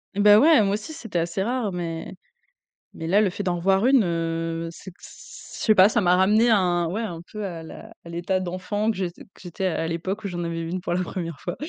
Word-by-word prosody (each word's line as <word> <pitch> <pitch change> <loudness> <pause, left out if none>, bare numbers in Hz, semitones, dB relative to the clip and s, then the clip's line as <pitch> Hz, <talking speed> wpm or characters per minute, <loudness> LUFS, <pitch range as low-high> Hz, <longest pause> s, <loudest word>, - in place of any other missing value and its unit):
Ben 205 +1 +7
ouais, 310 -3 +6
moi 200 0 +1
aussi 215 +9 -5
c'était 225 - -4
assez 170 +3 -2
rare 235 -3 -1
mais 165 -2 -5 0.8
mais 160 - -7
là 200 +5 +4
le 200 - +2
fait 200 +3 -5
d'en 175 -2 -1
revoir 195 +5 +2
une, 260 -4 +5
heu, 165 -1 -2
c'est 190 - -11
que 180 - -28
c - - -13 0.2
je - - -5
sais 215 - +5
pas 190 +2 +7
ça 230 0 +1
m'a 180 -1 +4
ramené 215 +5 +4
un 175 -5 +2
ouais 205 +7 -3
un 170 -7 -5
peu 215 -1 -5
à 170 -3 -6
la 220 +7 -11
à 170 - -10
l'état 175 +3 -1
d'enfant 185 +4 -2
que 215 - -7
j'ét 180 -2 -2 0.2
que - - -18
j'étais 180 +1 -5
à 165 -2 -1
l'époque 185 +6 -4
où - - -2
j'en 175 -2 -4
avais 165 0 -3
vu 165 - -5
une 185 0 -3
pour 175 - -2
la 185 +1 0
1re 170 -3 -5
fois. 175 - -5
185 Hz, 250 wpm, -24 LUFS, 170-210 Hz, 0.8 s, Ben